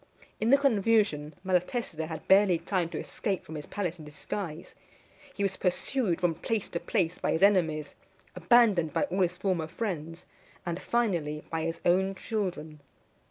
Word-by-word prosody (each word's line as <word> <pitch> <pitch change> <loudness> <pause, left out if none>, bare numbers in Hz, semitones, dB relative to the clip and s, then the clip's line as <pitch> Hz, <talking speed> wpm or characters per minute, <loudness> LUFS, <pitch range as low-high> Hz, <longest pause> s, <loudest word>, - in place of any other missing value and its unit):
In 220 - +1
the 275 - +7
confusion, 210 - +2
Malatesta 180 -2 -1
had 160 -2 -7
barely 190 -2 +6
time 170 0 -1
to - - -5
escape 195 -5 -3
from 160 - -9
his 150 -1 -6
palace 180 -4 -3
in 155 - -10
disguise. 160 +2 -6 0.6
He 200 - -2
was 190 -1 0
pursued 185 0 0
from 175 -2 +2
place 210 +5 -2
to 170 - -3
place 180 -5 -1
by - - 0
his 160 - +1
enemies, 160 -7 +3 0.4
abandoned 180 -3 +4
by - - +1
all 195 -9 -1
his 180 0 +1
former 180 -4 -1
friends, 165 -4 -5 0.4
and, 175 +1 -3
finally, 170 -11 0
by 165 -1 -1
his 165 0 -3
own 190 +2 +3
children. 180 -8 -4
180 Hz, 160 wpm, -29 LUFS, 160-205 Hz, 0.6 s, the